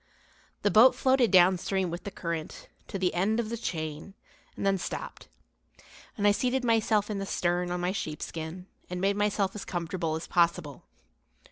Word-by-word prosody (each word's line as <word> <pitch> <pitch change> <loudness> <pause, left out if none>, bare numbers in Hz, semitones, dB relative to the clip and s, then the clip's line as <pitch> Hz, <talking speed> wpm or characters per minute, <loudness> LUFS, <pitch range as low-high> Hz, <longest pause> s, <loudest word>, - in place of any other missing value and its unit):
The 205 - +3
boat 240 +4 +7
floated 260 -3 +3
downstream 185 0 +3
with 175 - -6
the - - -3
current, 170 -4 -5 0.2
to - - -4
the 185 -1 0
end 200 +6 +1
of 225 -2 -2
the 235 - -2
chain, 160 -3 -5 0.4
and - - -3
then 195 -1 +2
stopped, - - -6 0.9
and 205 - 0
I 205 - +7
seated 250 +4 0
myself 220 -2 +2
in 200 - -2
the 195 - -3
stern 175 0 0
on 180 0 -2
my 180 +1 0
sheepskin 160 0 -5 0.2
and 180 0 -4
made 195 +2 +1
myself 205 -1 0
as 210 - -6
comfortable 170 -2 -3
as 160 - -5
possible. 170 -4 0
190 Hz, 170 wpm, -28 LUFS, 175-210 Hz, 0.9 s, boat